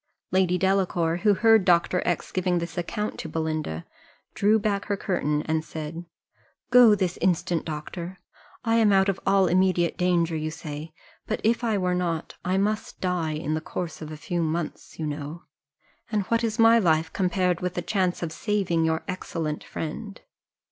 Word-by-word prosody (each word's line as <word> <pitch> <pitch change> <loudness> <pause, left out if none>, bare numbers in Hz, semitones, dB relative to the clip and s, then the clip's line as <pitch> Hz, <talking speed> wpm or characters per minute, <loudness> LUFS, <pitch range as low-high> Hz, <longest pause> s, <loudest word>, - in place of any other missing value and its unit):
Lady 185 -1 +3
Delacour, 180 -3 +1
who 205 +2 +3
heard 225 -1 +5
Dr. 180 0 +3
X 175 - -1
giving 180 -1 +1
this 170 0 -4
account 210 +4 -3
to 160 - -5
Belinda, 155 - -3 0.5
drew 210 +2 +3
back 205 -2 -1
her 200 - -1
curtain, 150 -6 -1
and 160 0 -1
said, 160 +2 -6 0.7
"Go 240 -3 +8
this 185 -3 -1
instant, 175 -2 +1
doctor 170 +4 -6 0.5
I 225 0 +3
am 220 -2 +5
out 195 0 +4
of 195 - -1
all 195 -1 +5
immediate 180 -1 +2
danger, 175 -2 +2
you 155 0 -2
say; 155 -1 -7 0.4
but 220 - -1
if 230 +3 +2
I 220 -3 +1
were 180 -1 0
not 170 -3 -2
I 185 +1 0
must 210 +2 -1
die 180 -4 -1
in 155 0 -2
the 155 - -1
course 165 0 -5
of 155 0 -7
a 155 - -7
few 175 +3 -2
months, 160 0 -3
you 160 - -3
know 150 +3 -5 0.7
and 210 -2 +1
what 230 0 +2
is 220 -1 -1
my 230 0 +6
life, 160 -4 +2
compared 180 -2 +1
with 180 0 -2
the 175 - -2
chance 185 -4 0
of 165 - -3
saving 190 -3 0
your 160 0 0
excellent 165 -5 -4
friend! 200 +6 -6
180 Hz, 175 wpm, -26 LUFS, 160-195 Hz, 0.7 s, Go